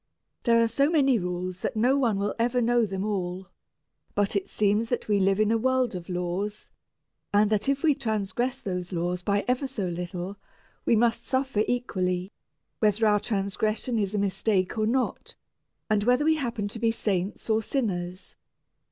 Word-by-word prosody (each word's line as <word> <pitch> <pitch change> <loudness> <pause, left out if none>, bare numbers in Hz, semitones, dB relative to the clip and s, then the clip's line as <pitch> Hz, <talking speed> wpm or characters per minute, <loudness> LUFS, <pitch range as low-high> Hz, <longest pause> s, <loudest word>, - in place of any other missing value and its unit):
There 230 -1 +5
are 230 - +4
so 275 +6 +2
many 275 -7 +3
rules 180 0 -3
that 250 - -3
no 245 +5 +3
one 240 -7 +2
will 200 +1 -1
ever 240 +2 +2
know 240 -1 +3
them 195 0 -3
all, 185 -2 -3 0.7
but 205 0 +1
it 200 - -1
seems 210 +2 +1
that 245 - -2
we 205 -1 +3
live 195 +1 +2
in 215 0 +3
a 225 - +2
world 260 0 +1
of 180 -1 -7
laws, 180 +4 -3 0.6
and 205 +1 +3
that 215 +5 +1
if 275 0 0
we 310 -2 +5
transgress 240 0 -2
those 180 -5 -4
laws 175 0 -1
by 200 +2 0
ever 255 +2 +1
so 220 -8 -3
little, 180 +2 -5 0.5
we - - +4
must 230 +1 +1
suffer 260 -5 +1
equally, 185 -6 -1 0.5
whether 215 +1 +3
our 210 -1 +4
transgression 215 +3 -1
is 200 0 -1
a - - +1
mistake 195 -1 0
or 215 -1 +1
not, 255 +2 -1 0.5
and 210 -1 +2
whether 250 +6 +3
we 315 0 +4
happen 235 -7 -2
to 225 - -8
be 230 0 +2
saints 200 -3 -2
or 220 0 +2
sinners. 185 -8 -3
215 Hz, 180 wpm, -27 LUFS, 190-240 Hz, 0.7 s, There